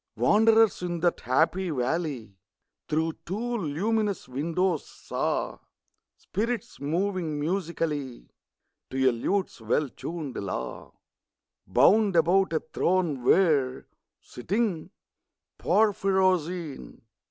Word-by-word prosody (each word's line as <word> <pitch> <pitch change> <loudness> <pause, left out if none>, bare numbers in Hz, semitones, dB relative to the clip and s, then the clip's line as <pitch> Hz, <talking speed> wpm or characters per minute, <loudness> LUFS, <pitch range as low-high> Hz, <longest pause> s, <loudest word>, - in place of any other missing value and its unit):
Wanderers 225 0 +4
in 175 -1 -3
that 175 -1 +1
happy 165 +9 +1
valley, 135 - -2 0.5
Through 160 +1 0
two 235 +6 -3
luminous 205 +6 -1
windows, 165 +5 -1
saw - - -3 0.6
Spirits 235 +3 -3
moving 165 +1 -1
musically, 155 - -3 0.6
To 130 - -5
a - - +6
lute's 180 - -2
well 135 +6 0
tunëd 155 -2 -6
law, 95 -2 -5 0.7
Bound 190 - +4
about 175 +4 +3
a 160 - 0
throne 170 -8 +1
where, 140 -5 +3 0.3
sitting 190 - -2 0.7
(Porphyrogene!) 185 - +1
170 Hz, 90 wpm, -27 LUFS, 145-195 Hz, 0.7 s, a